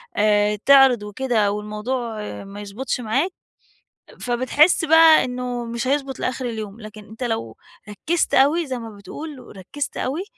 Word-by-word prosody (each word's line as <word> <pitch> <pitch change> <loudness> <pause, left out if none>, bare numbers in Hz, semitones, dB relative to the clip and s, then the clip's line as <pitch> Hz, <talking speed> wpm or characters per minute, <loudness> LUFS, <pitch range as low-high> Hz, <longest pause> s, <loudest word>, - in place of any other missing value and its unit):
آآ 210 0 +2
تعرض 270 -5 +6
وكده 210 -1 0
والموضوع 215 +3 -4 0.3
ما 200 +1 -10
يضبطش 210 +7 -4
معاك، 265 - 0 0.9
فبتحس 255 +8 +2
بقى 320 0 +7
إنه 250 -1 -4
مش 235 +1 -4
هيضبط 275 -1 -1
لآخر 255 0 -3
اليوم. 220 -3 -6
لكن 215 0 -11
أنتَ 220 +5 -9
لو 225 - -3 0.3
ركزت 320 +11 -1
أوي 300 +6 +4
زي 255 -2 -4
ما 230 -1 -8
بتقول 265 +8 -9
وركزت 250 +7 -7
أوي، 295 +8 -2
245 Hz, 140 wpm, -21 LUFS, 210-270 Hz, 0.9 s, بقى